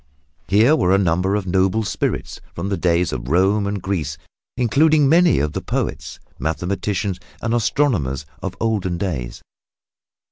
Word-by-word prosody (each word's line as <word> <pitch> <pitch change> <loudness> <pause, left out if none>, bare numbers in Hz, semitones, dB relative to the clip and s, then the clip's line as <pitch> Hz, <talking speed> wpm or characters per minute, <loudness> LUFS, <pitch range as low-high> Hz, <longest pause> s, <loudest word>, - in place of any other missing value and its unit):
Here 115 +10 +5
were 95 - +3
a - - +4
number 95 +1 +1
of 105 -2 -2
noble 95 +4 +1
spirits 100 - -3
from 90 +4 -3
the 100 - 0
days 85 -2 +1
of - - -5
Rome 95 +6 +2
and 100 0 -2
Greece, 80 -7 -3 0.4
including 145 +5 +3
many 170 +3 +5
of 75 +1 0
the - - -3
poets, - - -3 0.2
mathematicians 95 +3 -2 0.2
and 115 0 -2
astronomers 110 - 0 0.2
of - - -5
olden 100 -6 -1
days. 80 -11 -4
95 Hz, 145 wpm, -20 LUFS, 85-110 Hz, 0.4 s, Here